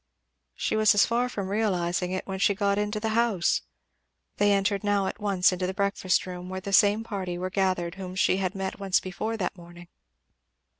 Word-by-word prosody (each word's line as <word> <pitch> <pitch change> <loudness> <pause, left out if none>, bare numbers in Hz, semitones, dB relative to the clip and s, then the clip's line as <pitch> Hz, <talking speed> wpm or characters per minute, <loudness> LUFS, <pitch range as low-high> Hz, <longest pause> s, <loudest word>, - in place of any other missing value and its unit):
She - - -1
was 215 -1 +4
as 205 - +6
far 240 +2 0
from 200 -5 -4
realizing 180 -4 0
it 185 - -3
when 190 -1 -5
she 200 +1 +3
got 200 0 +1
into 210 +1 -1
the 220 +1 -2
house. 220 -6 +1 0.8
They 205 0 +3
entered 200 0 +1
now 205 -1 +1
at 205 - -4
once 195 -4 +3
into 180 0 -2
the 190 - -4
breakfast 200 -2 +1
room 180 0 -7
where 190 0 -4
the 195 +1 -6
same 210 +2 +5
party 190 -5 -4
were 185 +1 -4
gathered 185 -3 0
whom 185 -1 -6
she 185 0 +2
had 190 -1 -2
met 195 0 -4
once 195 -2 +2
before 215 +5 -4
that 190 - -2
morning. 175 0 -13
195 Hz, 200 wpm, -27 LUFS, 185-205 Hz, 0.8 s, as